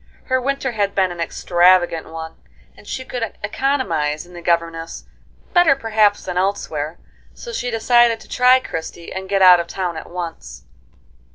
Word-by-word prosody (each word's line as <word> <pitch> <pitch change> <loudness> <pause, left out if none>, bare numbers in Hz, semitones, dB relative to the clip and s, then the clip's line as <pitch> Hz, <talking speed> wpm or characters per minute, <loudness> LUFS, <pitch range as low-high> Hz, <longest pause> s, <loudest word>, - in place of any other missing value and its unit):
Her 260 -1 0
winter 275 0 -1
had 205 -3 -1
been 190 -2 +2
an 175 - -8
extravagant 175 0 +2
one, 160 0 -7 0.4
and - - -18
she 260 - -5
could 240 -3 -5
economize 175 - -1
in 180 - -17
the 175 - -9
governess 165 -1 -2 0.5
better 350 -6 +5
perhaps 215 -5 +1
than 180 -1 -2
elsewhere; 165 -5 -2 0.4
so 475 - -9
she 245 - -2
decided 235 0 +3
to - - -14
try 250 +1 +4
Christie, 165 -6 -7
and 190 0 -6
get 195 -1 +2
out 180 -1 +8
of 170 - -3
town 180 -2 -3
at - - -8
once. 165 - -7
185 Hz, 165 wpm, -20 LUFS, 170-240 Hz, 0.5 s, out